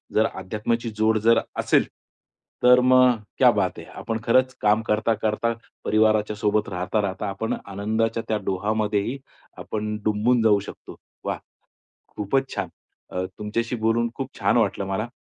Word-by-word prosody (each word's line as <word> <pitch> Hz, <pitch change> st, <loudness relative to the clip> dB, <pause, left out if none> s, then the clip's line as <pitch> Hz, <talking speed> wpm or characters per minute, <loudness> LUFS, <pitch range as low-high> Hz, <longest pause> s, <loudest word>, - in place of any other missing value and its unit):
जर 110 Hz, -, +4 dB
अध्यात्माची 110 Hz, +5 st, -2 dB
जोड 110 Hz, 0 st, +3 dB
जर 115 Hz, 0 st, +6 dB, 0.2 s
असेल, -, -, +3 dB, 0.8 s
तर 125 Hz, 0 st, +7 dB
मग 130 Hz, 0 st, +6 dB, 0.3 s
क्या -, -, +7 dB
बात -, -, -1 dB
है! -, -, -9 dB
आपण 115 Hz, 0 st, -5 dB
खरंचं 130 Hz, +2 st, +3 dB
काम 105 Hz, +1 st, +3 dB
करता-करता 110 Hz, +1 st, +1 dB, 0.3 s
परिवाराच्या 110 Hz, -1 st, +2 dB
सोबत 105 Hz, 0 st, 0 dB
राहता-राहता, 95 Hz, +2 st, -2 dB
आपण 100 Hz, +3 st, -3 dB
आनंदाच्या 110 Hz, +3 st, -1 dB
त्या 110 Hz, -, +1 dB
डोहामध्येही 105 Hz, +4 st, -1 dB, 0.4 s
आपण 105 Hz, 0 st, -4 dB
डुंबून 110 Hz, +3 st, +2 dB
जाऊ 105 Hz, -2 st, +5 dB
शकतो. -, -, -11 dB, 0.3 s
वाह! -, -, -2 dB, 0.8 s
खूपचं 135 Hz, +6 st, -1 dB
छान. -, -, -2 dB, 0.4 s
अ, 90 Hz, 0 st, -2 dB
तुमच्याशी 115 Hz, +3 st, -2 dB
बोलून 115 Hz, +1 st, +2 dB
खूप 135 Hz, -1 st, -6 dB
छान -, -, +3 dB
वाटलं 100 Hz, -, 0 dB
मला. 100 Hz, +5 st, -2 dB
110 Hz, 140 wpm, -24 LUFS, 105-115 Hz, 0.8 s, तर